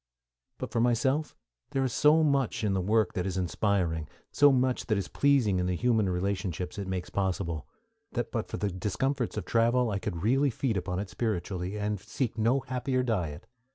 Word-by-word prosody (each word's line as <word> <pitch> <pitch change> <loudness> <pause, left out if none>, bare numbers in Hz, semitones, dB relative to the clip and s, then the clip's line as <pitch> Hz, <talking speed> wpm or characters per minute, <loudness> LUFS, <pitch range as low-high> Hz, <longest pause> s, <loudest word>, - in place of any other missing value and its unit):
But - - -5
for - - 0
myself 130 +6 +1 0.3
there 135 - 0
is 130 -4 -1
so 155 +2 +5
much 140 -6 +1
in 105 -2 +1
the 95 - +1
work 105 +1 +2
that 90 0 -2
is 95 -1 -2
inspiring, 90 -3 0 0.2
so 145 0 +6
much 130 -1 +1
that 110 -3 +2
is 100 - -2
pleasing 130 -10 +2
in 90 - 0
the 90 - 0
human 110 -1 +2
relationships 90 0 -2
it 100 - -4
makes 90 -1 -4
possible, 90 -5 -2 0.5
that 120 -1 -2
but 115 -3 -2
for - - -5
the 105 -1 -1
discomforts 110 +8 -1
of 100 - -3
travel 120 +1 +2
I 100 - -1
could 85 -4 -4
really 135 +6 +3
feed 120 -1 -1
upon 90 -1 -2
it 95 -1 -4
spiritually, 95 -1 -2
and 105 -1 -1
seek 125 +3 -3
no 115 +5 +2
happier 130 +1 -1
diet. 90 -12 -2
105 Hz, 190 wpm, -29 LUFS, 90-125 Hz, 0.5 s, so